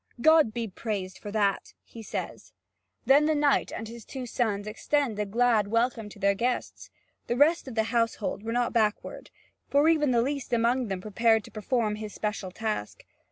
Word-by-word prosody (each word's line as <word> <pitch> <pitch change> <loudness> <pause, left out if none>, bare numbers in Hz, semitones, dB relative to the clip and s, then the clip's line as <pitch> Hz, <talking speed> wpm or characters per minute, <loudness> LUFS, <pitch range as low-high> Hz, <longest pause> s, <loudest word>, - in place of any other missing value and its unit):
"God 315 -3 +5
be 230 0 -3
praised 195 -2 -5
for 205 - -7
that," 200 -2 0
he 230 - -12
says. 220 - -6 0.5
Then 285 +3 +5
the 310 - +2
knight 290 -1 +2
and 225 - -6
his 230 0 -10
two 260 +2 -7
sons 215 -4 -1
extend 230 +1 -1
a 210 - -1
glad 225 -1 +2
welcome 230 0 0
to 205 - -13
their 200 0 +2
guests. 240 +5 -3 0.4
The 240 - -1
rest 305 +2 +3
of 255 - -7
the 220 - +2
household 230 -4 0
were 225 +1 -4
not 240 0 0
backward, 215 -2 -1 0.4
for 285 +2 +4
even 300 -3 +3
the 235 -2 +3
least 275 -1 -3
among 240 +2 +2
them 190 -2 -4
prepared 220 +2 +2
to - - -13
perform 215 -1 -1
his 215 -1 -7
special 210 -3 -3
task. 215 - -4
230 Hz, 185 wpm, -27 LUFS, 210-250 Hz, 0.5 s, God